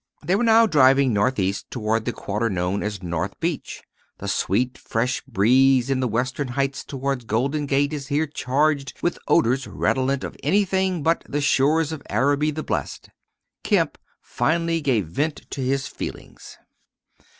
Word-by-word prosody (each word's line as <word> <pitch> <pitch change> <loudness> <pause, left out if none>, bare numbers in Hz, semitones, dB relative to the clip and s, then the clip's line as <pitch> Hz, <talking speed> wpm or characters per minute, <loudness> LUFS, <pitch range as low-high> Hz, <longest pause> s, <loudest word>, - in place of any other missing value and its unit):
They 175 +5 +1
were 215 - +1
now 230 0 +6
driving 135 - +4
northeast 100 -2 0
toward 110 -2 -1
the 120 - 0
quarter 105 +1 -2
known 90 0 -1
as 105 -3 -4
North 85 +2 -3
Beach. 165 -3 -3 0.3
The - - -7
sweet, 125 +6 0
fresh 125 +3 -2
breeze 130 +3 +3
in 135 - +1
the 130 - 0
western 130 +5 -1
heights 135 +2 -2
toward 135 -3 -3
Golden 140 +7 0
Gate 140 +2 +1
is 140 -3 -5
here 150 +3 +1
charged 145 0 0
with 175 - 0
odors 130 -4 +2
redolent 135 +1 0
of - - -6
anything 190 0 +1
but 165 +2 +1
the 145 - -1
"shores 150 +3 +2
of 160 - -6
Araby 145 +3 +2
the 155 +1 -4
blest." - - -4 0.5
Kemp - - +1 0.2
finally 165 +1 0
gave 125 - +1
vent 145 - -2
to 140 - -4
his 135 +1 0
feelings. - - -8
135 Hz, 155 wpm, -23 LUFS, 120-150 Hz, 0.5 s, now